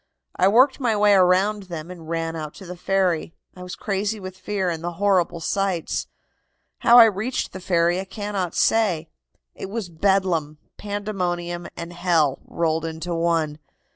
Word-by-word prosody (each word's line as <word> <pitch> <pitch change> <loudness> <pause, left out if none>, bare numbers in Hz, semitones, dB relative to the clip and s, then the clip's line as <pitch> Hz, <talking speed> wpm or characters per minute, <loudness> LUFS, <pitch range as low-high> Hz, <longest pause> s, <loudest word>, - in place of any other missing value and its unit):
I 185 - +3
worked 255 +7 +4
my 240 -5 +1
way 205 0 +4
around 190 +2 +3
them 165 0 -6
and 165 -3 -11
ran 165 0 -2
out 155 -2 -6
to 195 - -11
the 180 +1 -7
ferry. 180 -3 0 0.2
I 180 - -11
was 180 0 -7
crazy 205 +2 -2
with 185 -1 -8
fear 190 0 -2
and 165 -1 -5
the 175 0 -3
horrible 185 -2 +1
sights. 190 0 -1 0.7
"How 235 - +6
I 235 - +11
reached 220 +4 -1
the 190 - -6
ferry 175 -1 +1
I 190 - -4
cannot 195 -2 -4
say. 175 -8 +2 0.4
It - - -7
was 210 -3 -4
bedlam, 170 -4 0 0.2
pandemonium 180 -4 -3
and 170 +1 -6
hell 170 -6 +1
rolled 165 -1 -1
into 165 +2 -4
one. 165 -3 0
180 Hz, 165 wpm, -23 LUFS, 170-200 Hz, 0.7 s, I